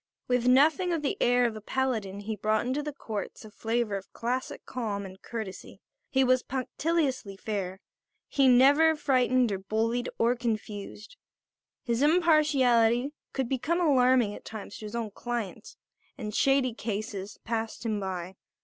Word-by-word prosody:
With 250 Hz, -1 st, +1 dB
nothing 310 Hz, +8 st, +4 dB
of 325 Hz, -3 st, -1 dB
the 280 Hz, -, 0 dB
air 245 Hz, 0 st, +4 dB
of 230 Hz, -2 st, -1 dB
a 215 Hz, -, -7 dB
paladin 215 Hz, -5 st, -2 dB
he 215 Hz, +1 st, -4 dB
brought 215 Hz, +2 st, 0 dB
into 260 Hz, +4 st, -1 dB
the 300 Hz, 0 st, -4 dB
courts 220 Hz, -5 st, -6 dB
a 215 Hz, -, -12 dB
flavour 225 Hz, -1 st, -1 dB
of 195 Hz, -, -11 dB
classic 250 Hz, +3 st, -3 dB
calm 210 Hz, -5 st, -3 dB
and 190 Hz, 0 st, -11 dB
courtesy. 215 Hz, -5 st, -7 dB, 0.3 s
He 265 Hz, 0 st, +3 dB
was 255 Hz, 0 st, +3 dB
punctiliously 265 Hz, -5 st, -2 dB
fair. 195 Hz, -3 st, -4 dB, 0.5 s
He 275 Hz, -2 st, +3 dB
never 285 Hz, +6 st, +6 dB
frightened 255 Hz, -4 st, +2 dB
or 195 Hz, -, -2 dB
bullied 225 Hz, +5 st, -1 dB
or 235 Hz, +2 st, +3 dB
confused. 215 Hz, -, -5 dB, 0.7 s
His 235 Hz, -1 st, -1 dB
impartiality 285 Hz, -7 st, +4 dB, 0.2 s
could 265 Hz, -3 st, -2 dB
become 310 Hz, +7 st, 0 dB
alarming 255 Hz, -8 st, +4 dB
at -, -, -10 dB
times 215 Hz, -1 st, -8 dB
to 215 Hz, -, -8 dB
his 210 Hz, +2 st, -6 dB
own 230 Hz, -3 st, -3 dB
clients, 235 Hz, -2 st, -5 dB, 0.4 s
and 210 Hz, -5 st, -5 dB
shady 270 Hz, 0 st, +3 dB
cases 210 Hz, -2 st, -5 dB
passed 225 Hz, 0 st, -3 dB
him 215 Hz, -2 st, 0 dB
by. 185 Hz, -2 st, -4 dB
240 Hz, 155 wpm, -28 LUFS, 215-265 Hz, 0.7 s, never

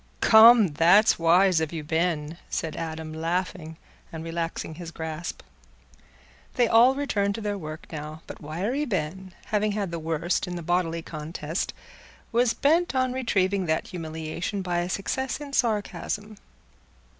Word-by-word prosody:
"Come, 220 Hz, -2 st, +8 dB
that's 175 Hz, +9 st, +5 dB
wise 175 Hz, +1 st, +4 dB
of 160 Hz, -, -2 dB
you, 160 Hz, -2 st, -5 dB
Ben," 160 Hz, 0 st, -1 dB
said 160 Hz, -2 st, -3 dB
Adam, 160 Hz, -1 st, -5 dB
laughing 165 Hz, 0 st, -3 dB, 0.3 s
and 160 Hz, -1 st, -6 dB
relaxing 165 Hz, -1 st, -4 dB
his 170 Hz, +1 st, -8 dB
grasp. 160 Hz, 0 st, -6 dB, 1.1 s
They 245 Hz, -2 st, +3 dB
all 240 Hz, +4 st, +6 dB
returned 200 Hz, -8 st, 0 dB
to 225 Hz, -, -5 dB
their 205 Hz, -1 st, -2 dB
work 155 Hz, -4 st, -7 dB
now; 155 Hz, 0 st, -7 dB
but -, -, -10 dB
Wiry 190 Hz, -, -2 dB
Ben, 190 Hz, -, -3 dB, 0.2 s
having 210 Hz, 0 st, +2 dB
had 200 Hz, -4 st, -2 dB
the 170 Hz, -, -3 dB
worst 165 Hz, +3 st, -1 dB
in 180 Hz, -, -4 dB
the 170 Hz, -, -5 dB
bodily 170 Hz, -1 st, 0 dB
contest, 155 Hz, +1 st, -4 dB, 0.6 s
was 235 Hz, 0 st, +2 dB
bent 320 Hz, +1 st, +2 dB
on 255 Hz, -1 st, +1 dB
retrieving 200 Hz, -7 st, 0 dB
that 160 Hz, 0 st, -1 dB
humiliation 165 Hz, +3 st, -4 dB
by 175 Hz, -1 st, -1 dB
a 175 Hz, +1 st, -2 dB
success 255 Hz, +7 st, -2 dB
in 285 Hz, -1 st, -8 dB
sarcasm. 215 Hz, -2 st, -1 dB
175 Hz, 145 wpm, -26 LUFS, 160-210 Hz, 1.1 s, Come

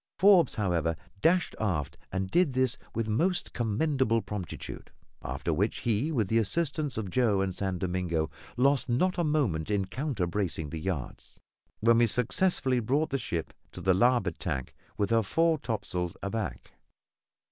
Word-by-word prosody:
Forbes, 190 Hz, -4 st, +6 dB
however, 85 Hz, -6 st, 0 dB, 0.3 s
dashed 175 Hz, +2 st, +3 dB
aft 90 Hz, -10 st, -1 dB, 0.2 s
and 95 Hz, 0 st, -2 dB
did 175 Hz, -6 st, +3 dB
this 130 Hz, -2 st, +2 dB, 0.2 s
with 115 Hz, -1 st, -1 dB
most 175 Hz, -, 0 dB
commendable 120 Hz, 0 st, +1 dB
promptitude; 100 Hz, -6 st, -6 dB, 0.3 s
after -, -, -2 dB
which -, -, 0 dB
he, 120 Hz, +7 st, 0 dB
with 115 Hz, -9 st, +1 dB
the 115 Hz, +3 st, +3 dB
assistance 150 Hz, +4 st, -1 dB
of 100 Hz, -5 st, -3 dB
Joe 110 Hz, -4 st, +2 dB
and 95 Hz, -1 st, -1 dB
San 95 Hz, 0 st, -2 dB
Domingo, 90 Hz, -3 st, -1 dB, 0.3 s
lost 135 Hz, +1 st, +3 dB
not 180 Hz, +10 st, +1 dB
a -, -, +3 dB
moment 135 Hz, -, 0 dB
in 100 Hz, -2 st, +1 dB
counter 125 Hz, -, -2 dB
bracing 85 Hz, -5 st, -2 dB
the 80 Hz, -, -4 dB
yards, 80 Hz, -7 st, -5 dB, 0.4 s
when 115 Hz, +1 st, +5 dB
we 120 Hz, -, +5 dB
successfully 125 Hz, -, +1 dB
brought 140 Hz, +7 st, 0 dB
the 135 Hz, -, 0 dB
ship 85 Hz, -9 st, -3 dB, 0.2 s
to -, -, -8 dB
on -, -, -9 dB
the 95 Hz, -, +4 dB
larboard 100 Hz, -3 st, +2 dB
tack, 65 Hz, -8 st, -3 dB, 0.2 s
with 100 Hz, +1 st, 0 dB
her 115 Hz, 0 st, +5 dB
fore 165 Hz, +9 st, +2 dB
topsail 100 Hz, -7 st, -2 dB
aback. 100 Hz, -, -4 dB
110 Hz, 160 wpm, -29 LUFS, 95-135 Hz, 0.4 s, Forbes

